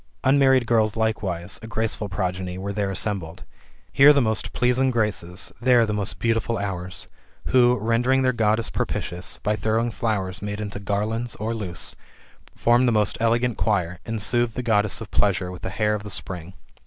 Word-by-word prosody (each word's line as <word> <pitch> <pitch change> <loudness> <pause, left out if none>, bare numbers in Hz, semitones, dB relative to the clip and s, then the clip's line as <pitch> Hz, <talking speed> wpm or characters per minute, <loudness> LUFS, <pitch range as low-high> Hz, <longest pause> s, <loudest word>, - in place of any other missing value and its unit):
Unmarried 135 -2 +4
girls 110 -3 +2
likewise, 100 -5 -2
a 110 - -8
graceful 110 -2 -2
progeny, 90 -1 -3
were 100 +2 -4
there 100 -1 -1
assembled. 95 -4 -3 0.5
Here 145 +2 +7
the 140 - +3
most 110 -4 0
pleasing 125 +2 +2
Graces, 105 -6 -1
there 120 -1 +5
the 105 - -2
most 100 -2 -2
beautiful 115 +2 0
Hours, 95 -2 -5 0.4
who, 125 -1 +5
rendering 120 +4 +2
their 130 0 +2
Goddess 110 0 +1
propitious, 90 +1 -3
by 105 - +1
throwing 110 +2 0
flowers 95 -5 -2
made 105 0 -4
into 105 -1 -5
garlands 105 +4 -2
or 110 +2 -3
loose, 95 -6 -4 0.6
formed 120 +1 +3
a - - +2
most 105 -3 +1
elegant 120 +1 +1
choir, 90 -5 0
and 115 -1 -4
soothed 120 +2 0
the 125 - -3
Goddess 105 -2 +1
of 110 - -8
pleasures 90 -3 +1
with 90 - -9
the 95 +3 -6
air 105 0 +2
of 105 - -2
the 105 - -8
spring. 90 -2 -4
110 Hz, 175 wpm, -24 LUFS, 95-115 Hz, 0.6 s, Here